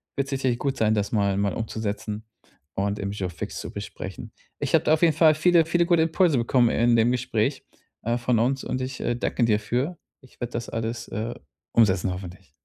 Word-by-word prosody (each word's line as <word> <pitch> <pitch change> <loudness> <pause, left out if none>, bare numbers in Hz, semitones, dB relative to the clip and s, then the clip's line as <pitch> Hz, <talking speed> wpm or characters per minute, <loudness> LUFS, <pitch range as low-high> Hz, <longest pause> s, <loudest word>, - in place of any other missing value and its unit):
wird's 140 0 -2
sicherlich 130 -3 0
gut 135 0 -2
sein, 110 0 +2
das 105 -1 -1
mal 100 -3 +1
mal 100 -2 0
umzusetzen 110 -1 -4 0.5
und 100 +1 -1
im 100 0 -3
Jour 95 -3 -3
fixe 90 -2 -6
zu - - -7
besprechen. - - -7 0.3
Ich - - -3
habe - - +5
da 155 - +4
auf 160 - +2
jeden 160 -3 +5
Fall 155 -1 +5
viele, 170 +1 +4
viele 170 +2 +2
gute 170 -2 +3
Impulse 160 -3 +3
bekommen 120 0 +3
in 120 +1 +3
dem 115 +1 +4
Gespräch, 125 +1 -1 0.4
äh, 115 +2 0
von 120 -1 +1
uns 130 +3 +1
und 130 - -3
ich, 130 0 -4
äh, - - 0
danke 120 - -1
dir 105 -2 +2
für. 125 +10 -1 0.3
Ich 130 -1 -21
werde 120 0 -4
das 120 - -4
alles, 115 0 -4
äh, 115 +2 -4 0.4
umsetzen 95 -5 +3
hoffentlich. 90 -2 -8
120 Hz, 210 wpm, -25 LUFS, 105-135 Hz, 0.5 s, habe